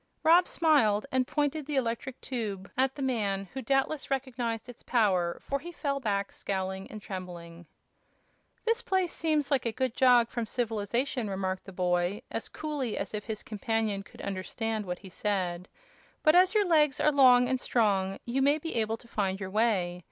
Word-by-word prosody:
Rob 345 +3 +6
smiled 250 -11 +3
and 255 -1 +1
pointed 295 -1 -1
the 295 - -2
electric 245 0 -2
tube 205 -7 -4
at 265 +1 +1
the 280 - -4
man, 200 -6 -1
who 265 - -4
doubtless 270 +4 0
recognized 245 -4 -2
its 245 -1 -11
power, 190 -8 +1
for 280 - -3
he 345 +5 -8
fell 280 -4 -2
back 200 -5 -1
scowling 190 0 -4
and 215 - -7
trembling. 175 -4 -8 1.0
"This 460 +1 +2
place 375 -5 0
seems 305 -3 0
like 260 -4 +2
a - - 0
good 255 0 -1
jog 245 -3 +5
from 235 -3 -3
civilization," 235 +1 -1
remarked 190 -1 -3
the 195 - -9
boy, 180 +3 0
as - - -3
coolly 290 -7 -3
as - - -4
if 210 -1 -4
his 220 -2 -5
companion 215 -1 -1
could 195 - -13
understand 210 +2 -3
what 180 0 -3
he 195 - -12
said; 185 -2 -2 0.5
"but 310 - +6
as 370 +4 +5
your 415 -1 +4
legs 300 -6 +3
are 300 - +4
long 250 -3 +6
and 260 0 0
strong 195 -5 +1
you 250 +3 0
may 285 +2 +4
be 325 +1 -5
able 225 0 0
to 235 - -17
find 195 -4 -1
your 190 -1 -5
way. 195 -5 +1
230 Hz, 180 wpm, -29 LUFS, 195-270 Hz, 1.0 s, Rob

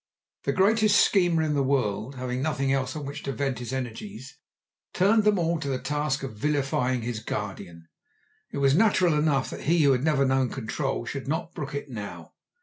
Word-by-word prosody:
The - - +2
greatest 215 +2 +4
schemer 175 -5 +3
in 155 -1 0
the 140 - +1
world, 130 -2 0
having 125 0 -3
nothing 135 -2 0
else 130 -1 -1
on 150 -2 -5
which 140 +2 -6
to 140 - -3
vent 135 -2 -2
his 120 -1 -6
energies, 120 -1 -6 0.5
turned 210 +3 +3
them 210 -1 +4
all 170 -1 0
to 145 - -4
the 135 -2 0
task 145 +1 -2
of 135 - -5
vilifying 130 -1 0
his 115 -1 -3
guardian. 85 -6 -6 0.6
It - - -6
was 135 -1 +3
natural 185 -2 +4
enough 150 -3 +1
that - - -7
he 165 +1 +3
who 140 - +5
had 130 0 +1
never 150 -3 +3
known 130 -1 +2
control 130 +1 -3
should 135 +2 -5
not 160 +3 -2
brook 145 -1 -5
it 145 - -4
now. 110 -6 -8
140 Hz, 195 wpm, -26 LUFS, 130-155 Hz, 0.6 s, who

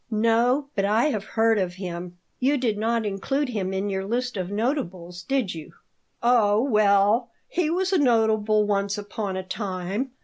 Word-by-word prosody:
"No, 235 +5 +2
but 195 - 0
I 215 +5 +2
have 215 -8 -2
heard 225 -1 +4
of 180 -2 -2
him. 180 -1 -6 0.2
You 275 +3 +2
did 240 -5 0
not 225 +1 0
include 255 +8 -1
him 195 -5 -2
in 190 +1 -2
your 190 -1 -2
list 245 +4 -2
of 185 -2 -3
notables, 190 - -3
did 255 -2 -1
you?" 160 -2 -9 0.5
"Oh, 220 -4 +4
well, 215 0 +3 0.2
he 340 -3 0
was 375 +3 0
a 370 - +4
notable 220 -4 +3
once 200 0 0
upon 205 -1 -4
a 190 - -3
time. 190 +4 -3
215 Hz, 170 wpm, -24 LUFS, 195-245 Hz, 0.5 s, heard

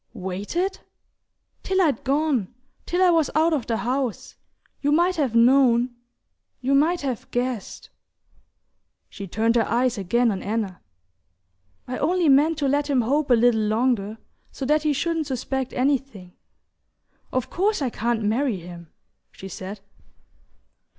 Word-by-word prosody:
"Waited?" 205 - -3 0.8
"Till 380 0 0
I'd 305 -10 +1
gone: 275 -7 0 0.4
till 360 +2 +1
I 360 - +5
was 325 -3 +2
out 320 +1 +3
of 280 -6 -2
the 230 - 0
house. 250 0 -3 0.5
You 290 - +1
might 345 +4 +3
have 270 -7 0
known... 245 0 +4 0.6
you 265 +2 0
might 320 +5 +3
have 260 -5 -4
guessed..." 245 -3 -4 1.2
She 200 -1 -8
turned 225 +5 +1
her 230 - +2
eyes 245 -1 +1
again 230 +5 +2
on 195 - -4
Anna. 205 -3 -3 1.1
"I 255 - -4
only 345 +1 +2
meant 295 +4 +4
to 285 -2 0
let 290 +2 0
him 265 -3 +3
hope 280 +5 0
a 245 - +6
little 235 -1 +3
longer, 215 -1 0 0.3
so 270 - -5
that 300 +3 +2
he 305 -1 +1
shouldn't 320 +2 -1
suspect 265 0 -3
anything; 255 -9 -1 1.0
of 255 -2 -2
course 415 +4 +1
I 265 -4 -1
can't 230 0 -1
marry 230 +2 0
him," 170 -2 -11 0.4
she 190 - -10
said. 195 +2 -8
255 Hz, 145 wpm, -23 LUFS, 225-295 Hz, 1.2 s, a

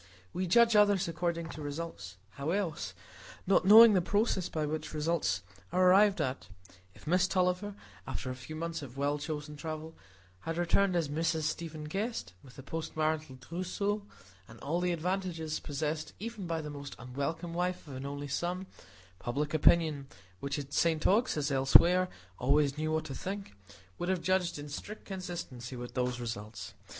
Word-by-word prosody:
We 185 0 -1
judge 230 +5 +5
others 205 -3 +5
according 170 0 -2
to 155 - -7
results; 145 - -6
how 140 +5 -4
else?—not 170 - -2
knowing 220 +2 +10
the 185 - +4
process 205 0 +1
by 155 -1 -1
which 155 +1 -4
results 165 +3 0 0.3
are 185 +1 +4
arrived 200 +1 +5
at. 130 +1 -2 0.5
If - - -16
Miss 180 +3 +3
Tulliver, 185 +2 0 0.3
after 130 - -3
a - - -5
few 125 +5 -8
months 165 +1 -3
of 135 -2 -9
well 145 +1 0
chosen 150 0 -5
travel, 160 +1 -6 0.4
had 165 - -4
returned 180 +2 +2
as 165 -3 +1
Mrs 160 +2 0
Stephen 155 0 -3
Guest, 195 - -3
with 125 -2 -15
a 135 - -9
post 160 +2 -5
marital 155 -3 0
trousseau, 185 +8 -2 0.5
and 110 0 -13
all 160 +5 0
the 180 0 +1
advantages 170 -2 -2
possessed 155 +2 -3
even 215 -3 -5
by 165 -1 -1
the 150 -1 -6
most 140 -1 -7
unwelcome 140 +7 -4
wife 180 -1 -2
of 140 - -7
an 135 +2 -5
only 145 0 -5
son, 175 +6 -2 0.5
public 145 +5 -2
opinion, 155 -2 +4 0.3
which 140 +1 -2
at 145 0 -6
St 160 -2 +2
Ogg's, 220 0 +3
as 145 0 0
else 135 0 0
where, 180 +2 +7 0.3
always 140 +2 +3
knew 155 +1 -1
what 160 0 0
to 135 - -5
think, 195 - -5 0.5
would 175 - -2
have 185 -3 0
judged 185 -2 +1
in 145 0 -7
strict 205 +9 -7
consistency 175 - -6
with 120 0 -7
those 125 -1 -1
results. 115 -2 -6
160 Hz, 170 wpm, -32 LUFS, 145-180 Hz, 0.5 s, knowing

